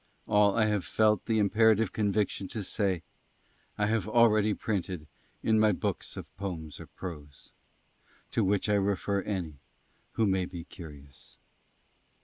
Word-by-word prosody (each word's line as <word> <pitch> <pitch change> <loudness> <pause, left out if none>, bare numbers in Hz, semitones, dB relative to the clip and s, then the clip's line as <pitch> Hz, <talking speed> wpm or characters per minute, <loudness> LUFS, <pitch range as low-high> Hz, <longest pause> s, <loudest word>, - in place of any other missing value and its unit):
ALL 105 -1 +4
I 110 - +4
HAVE 105 -3 0
FELT 105 +3 +2
THE 110 - +2
IMPERATIVE 110 0 +3
CONVICTION 105 -2 0
TO 105 +2 -4
SAY 95 -3 -1 0.7
I 105 - +2
HAVE 110 -2 0
ALREADY 110 -2 +4
PRINTED 95 -6 -3 0.4
IN 110 -1 +3
MY 110 -1 +4
BOOKS - - -3
OF - - -9
POEMS 85 -6 -5
OR - - -9
PROSE; 75 -6 -9 0.8
TO - - +1
WHICH 100 +2 +1
I 105 -1 +3
REFER 100 0 0
ANY 90 -8 -4 0.5
WHO 115 - +2
MAY 95 -2 +1
BE 90 -2 -7
CURIOUS. 75 -6 -13
100 Hz, 140 wpm, -29 LUFS, 90-105 Hz, 0.8 s, ALL